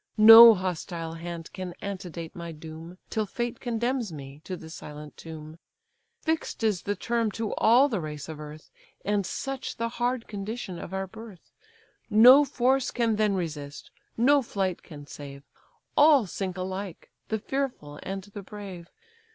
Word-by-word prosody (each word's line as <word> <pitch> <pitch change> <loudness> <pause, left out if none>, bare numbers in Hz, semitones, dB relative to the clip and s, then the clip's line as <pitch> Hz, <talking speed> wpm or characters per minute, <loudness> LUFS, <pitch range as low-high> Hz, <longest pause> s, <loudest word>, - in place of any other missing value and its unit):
No 225 +1 +11
hostile 170 -3 -4
hand 170 0 -7
can 185 -2 -6
antedate 180 -5 -6
my 170 -1 -6
doom, 160 +2 -10
Till 215 -1 -1
fate 240 +3 -4
condemns 240 -2 -1
me 140 -1 -10
to 185 - -5
the 160 -1 -11
silent 150 -2 -9
tomb. 160 0 -10 0.6
Fix'd 320 -7 -2
is 210 -5 +1
the 205 - -2
term 230 +3 0
to 225 -2 -3
all 245 +5 +5
the 220 -10 -2
race 150 -2 -6
of 160 -1 -7
earth; 150 +1 -10 0.3
And 205 -2 0
such 270 -1 -5
the 230 0 -1
hard 240 0 -2
condition 205 -3 -5
of - - -8
our 190 0 -2
birth: 220 -2 -13 0.6
No 245 +6 +8
force 265 -1 +1
can 230 -3 0
then 210 -2 +2
resist, 150 -5 -5 0.3
no 280 +5 +5
flight 195 -6 -2
can 145 -3 -11
save, 140 -1 -10 0.5
All 290 -5 +6
sink 185 0 -4
alike, 185 0 -6 0.2
the 220 - -1
fearful 225 - -4
and 195 0 -5
the 205 +1 -9
brave. 195 -4 -9
195 Hz, 155 wpm, -27 LUFS, 165-230 Hz, 0.6 s, No